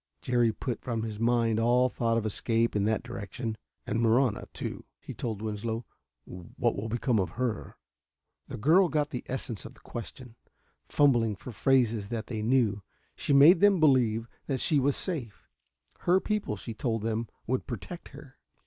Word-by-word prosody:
Jerry 120 Hz, -2 st, +2 dB
put 120 Hz, +2 st, -4 dB
from 115 Hz, -3 st, -3 dB
his 110 Hz, -2 st, -5 dB
mind 115 Hz, -1 st, +2 dB
all 120 Hz, +2 st, +4 dB
thought 115 Hz, -2 st, 0 dB
of 110 Hz, -, -1 dB
escape 115 Hz, +2 st, 0 dB
in 100 Hz, -1 st, +2 dB
that 110 Hz, +1 st, 0 dB
direction. 115 Hz, 0 st, -5 dB, 0.3 s
"And 115 Hz, -, -1 dB
Marahna, 115 Hz, 0 st, +2 dB
too," -, -, -6 dB, 0.2 s
he -, -, -8 dB
told 110 Hz, -3 st, -4 dB
Winslow. 110 Hz, +2 st, -3 dB, 0.4 s
"What 90 Hz, -1 st, -3 dB
will 110 Hz, +3 st, -4 dB
become 120 Hz, 0 st, +1 dB
of 90 Hz, -3 st, -2 dB
her?" 120 Hz, -4 st, -3 dB, 0.7 s
The -, -, -6 dB
girl 170 Hz, -, +4 dB
got 150 Hz, -2 st, 0 dB
the 125 Hz, -, -3 dB
essence 120 Hz, -6 st, -4 dB
of -, -, -10 dB
the -, -, -19 dB
question. 120 Hz, 0 st, -9 dB, 0.5 s
Fumbling 120 Hz, -7 st, +3 dB
for 125 Hz, -, -9 dB
phrases 115 Hz, -4 st, +2 dB
that 115 Hz, -2 st, -3 dB
they 110 Hz, -3 st, -4 dB
knew, 110 Hz, -3 st, +2 dB, 0.3 s
she -, -, -2 dB
made 145 Hz, +6 st, +8 dB
them 200 Hz, -1 st, +5 dB
believe 120 Hz, -7 st, +3 dB, 0.2 s
that 135 Hz, -3 st, -1 dB
she 150 Hz, +2 st, +3 dB
was 140 Hz, +1 st, +2 dB
safe. 135 Hz, -, -5 dB, 0.5 s
Her 180 Hz, +2 st, +3 dB
people, 210 Hz, -, -2 dB
she 110 Hz, +3 st, -7 dB
told 115 Hz, -2 st, -2 dB
them, 115 Hz, 0 st, -2 dB, 0.2 s
would 130 Hz, +2 st, -2 dB
protect 135 Hz, -, -7 dB
her. 140 Hz, -1 st, -14 dB
115 Hz, 170 wpm, -29 LUFS, 110-130 Hz, 0.7 s, made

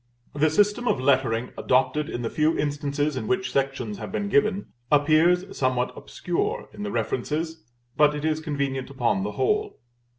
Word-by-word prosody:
The 150 Hz, +2 st, +2 dB
system 210 Hz, +8 st, +2 dB
of 135 Hz, -, +2 dB
lettering 130 Hz, -3 st, +1 dB
adopted 130 Hz, +4 st, +1 dB
in 120 Hz, -, -4 dB
the 115 Hz, -, -1 dB
few 155 Hz, +1 st, +2 dB
instances 145 Hz, 0 st, -1 dB
in 130 Hz, -, -4 dB
which 190 Hz, 0 st, 0 dB
sections 135 Hz, -6 st, -1 dB
have -, -, -6 dB
been 205 Hz, -2 st, -2 dB
given, 210 Hz, -1 st, +1 dB, 0.2 s
appears 165 Hz, +6 st, +3 dB
somewhat 130 Hz, -1 st, 0 dB
obscure -, -, -3 dB
in -, -, -9 dB
the 105 Hz, -, -3 dB
references, 150 Hz, +9 st, -2 dB, 0.3 s
but 150 Hz, 0 st, +4 dB
it 150 Hz, +1 st, -4 dB
is 155 Hz, 0 st, +1 dB
convenient 140 Hz, -4 st, -3 dB
upon 120 Hz, -7 st, 0 dB
the 105 Hz, +2 st, -3 dB
whole. 425 Hz, 0 st, 0 dB
145 Hz, 165 wpm, -25 LUFS, 130-165 Hz, 0.3 s, but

